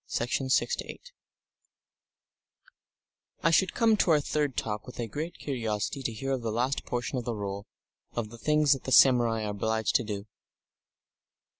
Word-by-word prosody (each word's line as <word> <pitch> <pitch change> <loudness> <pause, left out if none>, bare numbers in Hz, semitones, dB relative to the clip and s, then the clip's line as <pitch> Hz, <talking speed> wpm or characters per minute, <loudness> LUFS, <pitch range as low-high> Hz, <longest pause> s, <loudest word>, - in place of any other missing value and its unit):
Section 120 +3 -1
6 - - +2 2.7
I 165 - +4
should 185 +3 +3
come 225 -1 +4
to 190 - +2
our 155 -2 +5
third 145 -2 -1
talk 105 -1 -3
with 125 - -10
a 120 - -1
great 150 +10 -5
curiosity 115 -1 -3
to 125 - -2
hear 135 +5 -4
of 130 -2 -1
the 115 -1 -2
last 125 +5 -1
portion 125 +1 -2
of 120 - -7
the 120 - -2
Rule, 100 0 -5 0.5
of 110 -3 -3
the 120 - -11
things 150 0 +3
that 135 - -6
the 130 - -3
samurai 120 -3 +5
are 105 - -2
obliged 110 +2 -1
to 125 - -4
do. 105 -2 -5
120 Hz, 165 wpm, -28 LUFS, 110-140 Hz, 2.7 s, our